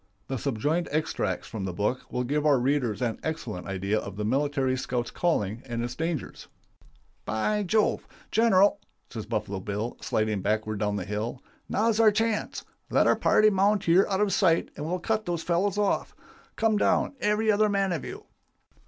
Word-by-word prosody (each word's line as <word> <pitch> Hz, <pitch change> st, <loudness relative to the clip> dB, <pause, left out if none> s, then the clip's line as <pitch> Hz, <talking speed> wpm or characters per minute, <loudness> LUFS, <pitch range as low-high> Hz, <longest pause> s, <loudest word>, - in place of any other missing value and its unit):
The 135 Hz, -2 st, -2 dB
subjoined 145 Hz, +8 st, -1 dB
extracts 105 Hz, -, -1 dB
from 105 Hz, -4 st, -5 dB
the 95 Hz, -, -3 dB
book 105 Hz, +7 st, -2 dB
will 125 Hz, -, -1 dB
give 145 Hz, +4 st, 0 dB
our 150 Hz, -2 st, +4 dB
readers 125 Hz, -3 st, 0 dB
an 115 Hz, -2 st, -1 dB
excellent 120 Hz, -, -4 dB
idea 95 Hz, +2 st, -1 dB
of 100 Hz, -2 st, -7 dB
the 105 Hz, -, -2 dB
military 135 Hz, +1 st, +1 dB
scout's 125 Hz, -2 st, -3 dB
calling 115 Hz, -, 0 dB
and 120 Hz, -1 st, -3 dB
its 120 Hz, 0 st, -3 dB
dangers: 160 Hz, -1 st, -4 dB, 0.8 s
"'By 210 Hz, -, 0 dB
Jove! 210 Hz, +2 st, +1 dB, 0.2 s
General,' 205 Hz, -3 st, +4 dB, 0.3 s
says 110 Hz, -3 st, -6 dB
Buffalo 105 Hz, -3 st, -2 dB
Bill, 105 Hz, +5 st, -4 dB
sliding 110 Hz, -2 st, 0 dB
backward 110 Hz, +1 st, -1 dB
down 105 Hz, -1 st, 0 dB
the 95 Hz, -3 st, -3 dB
hill, 105 Hz, +6 st, -4 dB, 0.3 s
'now's 220 Hz, +1 st, +1 dB
our 225 Hz, -1 st, +7 dB
chance. 220 Hz, 0 st, -1 dB, 0.2 s
Let -, -, +3 dB
our -, -, +4 dB
party 215 Hz, 0 st, +4 dB
mount 200 Hz, +1 st, +2 dB
here 175 Hz, +2 st, +4 dB
out 195 Hz, 0 st, 0 dB
of 205 Hz, -2 st, +2 dB
sight 170 Hz, -4 st, +3 dB
and 150 Hz, -, -5 dB
we'll 180 Hz, +2 st, -1 dB
cut 215 Hz, +3 st, -2 dB
those 170 Hz, -2 st, -2 dB
fellows 185 Hz, +4 st, 0 dB
off. 205 Hz, -1 st, 0 dB, 0.4 s
Come 225 Hz, -1 st, +2 dB
down, -, -, +2 dB
every 210 Hz, +1 st, +2 dB
other 215 Hz, +1 st, +3 dB
man 195 Hz, -2 st, +1 dB
of 165 Hz, -5 st, -2 dB
you. -, -, -7 dB
145 Hz, 180 wpm, -27 LUFS, -, 0.8 s, our